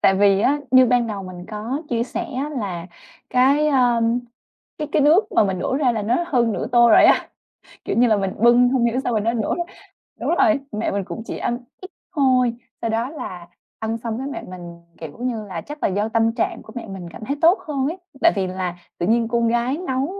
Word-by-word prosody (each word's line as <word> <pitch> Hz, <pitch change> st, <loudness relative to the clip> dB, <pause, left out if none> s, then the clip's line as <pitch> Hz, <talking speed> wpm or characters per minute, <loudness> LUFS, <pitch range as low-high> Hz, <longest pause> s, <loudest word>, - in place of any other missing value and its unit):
Tại 195 Hz, -, +4 dB
vì 195 Hz, 0 st, +4 dB
á, 285 Hz, +6 st, +2 dB
như 255 Hz, 0 st, +7 dB
ban 245 Hz, -1 st, +2 dB
đầu 205 Hz, -3 st, -4 dB
mình 180 Hz, -1 st, -9 dB
có 225 Hz, +8 st, -4 dB
chia 230 Hz, -1 st, 0 dB
sẻ 245 Hz, -, -4 dB
á, 275 Hz, +4 st, -4 dB
là 180 Hz, -5 st, -4 dB, 0.4 s
cái, 275 Hz, +4 st, +3 dB
ơm, 240 Hz, -3 st, +2 dB, 0.6 s
cái 300 Hz, -, -3 dB
cái 295 Hz, -, +3 dB
nước 320 Hz, +9 st, +4 dB
mà -, -, +4 dB
mình 190 Hz, -2 st, -1 dB
đổ 260 Hz, -, -1 dB
ra 270 Hz, -4 st, +2 dB
là 220 Hz, -2 st, -2 dB
nó 245 Hz, +11 st, +1 dB
hơn 240 Hz, -8 st, +1 dB
nửa -, -, -3 dB
tô 240 Hz, -1 st, +6 dB
rồi -, -, +7 dB
á, -, -, +4 dB, 0.6 s
kiểu -, -, -1 dB
như, 245 Hz, -, +5 dB
là 215 Hz, -2 st, +3 dB
mình 195 Hz, -1 st, -1 dB
bưng 240 Hz, +2 st, +5 dB
hông 250 Hz, -2 st, +2 dB
hiểu 240 Hz, +2 st, +1 dB
sao 245 Hz, -, -1 dB
mà 220 Hz, -, +2 dB
nó 230 Hz, +3 st, 0 dB
đổ 220 Hz, -3 st, -1 dB
ra 345 Hz, -, -2 dB, 0.6 s
đúng -, -, -2 dB
rồi, 320 Hz, -7 st, +3 dB
mẹ 210 Hz, +1 st, -2 dB
mình 200 Hz, 0 st, -1 dB
cũng 225 Hz, -, -7 dB
chỉ -, -, -5 dB
ăn 240 Hz, -, -1 dB, 0.2 s
ít 370 Hz, -, -10 dB, 0.2 s
thôi. 255 Hz, -4 st, +3 dB, 0.3 s
Sau 230 Hz, -, -1 dB
đó 230 Hz, +3 st, -1 dB
là 185 Hz, -, -8 dB, 0.3 s
ăn 225 Hz, +1 st, -2 dB
xong 225 Hz, -1 st, -4 dB
cái 265 Hz, +2 st, -4 dB
mẹ 285 Hz, -, -5 dB, 0.2 s
mình, 170 Hz, -1 st, -11 dB, 0.2 s
kiểu 160 Hz, -3 st, -9 dB
như 240 Hz, -3 st, -3 dB
là, 180 Hz, -5 st, -6 dB
chắc 295 Hz, 0 st, -9 dB
là -, -, +3 dB
do 205 Hz, +3 st, -1 dB
tâm 225 Hz, 0 st, +2 dB
trạng 230 Hz, -, -1 dB
của 220 Hz, -, -13 dB
mẹ 235 Hz, -2 st, -6 dB
mình 185 Hz, -3 st, -8 dB
cảm 215 Hz, -, -9 dB
thấy 280 Hz, +4 st, -2 dB
tốt 340 Hz, +4 st, +5 dB
hơn 275 Hz, -3 st, -1 dB
ấy. 340 Hz, +4 st, -3 dB, 0.2 s
Tại 335 Hz, -, +6 dB
vì 190 Hz, -2 st, 0 dB
là 185 Hz, -1 st, -3 dB, 0.2 s
tự 175 Hz, -, -1 dB
nhiên 230 Hz, +1 st, +2 dB
con 235 Hz, 0 st, +1 dB
gái 240 Hz, +4 st, 0 dB
nấu 260 Hz, +1 st, 0 dB
235 Hz, 240 wpm, -21 LUFS, 205-260 Hz, 0.6 s, như